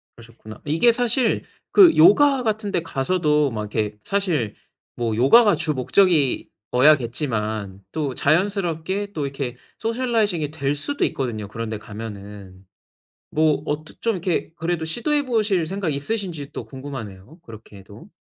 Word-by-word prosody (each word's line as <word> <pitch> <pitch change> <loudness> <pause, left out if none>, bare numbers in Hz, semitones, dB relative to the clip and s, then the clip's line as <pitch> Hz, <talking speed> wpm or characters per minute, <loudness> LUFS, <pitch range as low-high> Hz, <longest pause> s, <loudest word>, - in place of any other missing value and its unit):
그러셨구나. 110 -2 -13
이게 165 +11 +4
사실 245 0 +1 0.3
그 375 -5 +7
요가 265 - +6
같은 215 -2 -1
데 - - 0
가서도 150 -1 +1
막 110 -2 -4
이렇게 105 -2 -1
사실 175 - -1 0.4
뭐 115 -2 -1
요가가 205 - +6
주목적이어야겠지만 125 - +1
또 145 -5 -3
자연스럽게 190 +3 0
또 150 -5 -2
이렇게 135 -3 -5 0.2
socializing이 225 - 0
될 140 -2 -1
수도 285 - -1
있거든요, 110 -6 -3
그런 115 +2 -5
데 110 - -3
가면은. 100 -3 -10 0.7
뭐 155 -2 +2
어떻 150 +1 -5
좀 230 - +1
이렇게 180 -2 -2
그래도 165 -1 -2
시도해 285 - 0
보실 215 -8 +1
생각이 180 -4 -2
있으신지 160 -3 -4
또 - - -6
궁금하네요, 130 - -9
그렇게 110 -2 -13
해도. 105 - -14
150 Hz, 345 characters per minute, -22 LUFS, -, 0.7 s, 그